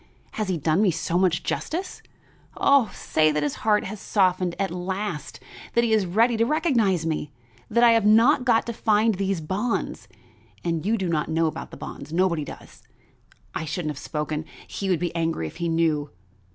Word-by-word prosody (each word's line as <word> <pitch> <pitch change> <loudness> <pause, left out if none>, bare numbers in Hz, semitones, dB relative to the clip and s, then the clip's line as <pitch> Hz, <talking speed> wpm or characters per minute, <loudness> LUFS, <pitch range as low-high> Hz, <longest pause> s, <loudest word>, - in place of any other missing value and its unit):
Has 215 -2 -3
he 180 - 0
done 160 +4 +1
me 210 - +4
so 165 0 -2
much 180 -3 +2
justice? 365 +4 -3 0.6
Oh, 275 -5 +4
say 155 0 +1
that 150 0 -1
his 145 - -1
heart 210 -1 +3
has 205 +2 -6
softened 185 -4 +1
at 195 -2 -1
last; 180 -3 -4 0.4
that 235 - +4
he 230 -2 +2
is 210 -4 +2
ready 230 +7 +3
to 225 - +3
recognize 230 - +1
me; 155 -2 -2 0.4
that 235 +2 +3
I 235 - +8
have 230 -2 +3
not 230 +6 +5
got 235 -3 +3
to 235 - -4
find 220 0 +2
those 195 -2 -1
bonds 200 +9 -2 0.6
but 165 -2 -1
you 225 +1 +2
do 190 -3 -2
not 160 -3 -1
know 165 +1 +1
about 155 - -4
the - - -11
bonds 140 +2 -8
nobody 170 -2 +1
does. - - -11 0.7
I - - -3
shouldn't 160 0 -3
have 145 - -8
spoken; 150 +1 -3 0.2
he 195 - -4
would 180 - +3
be 175 -1 -3
angry 165 - -1
if 80 - -8
he 170 -1 -1
knew. 160 -3 +1
185 Hz, 190 wpm, -24 LUFS, 160-220 Hz, 0.7 s, I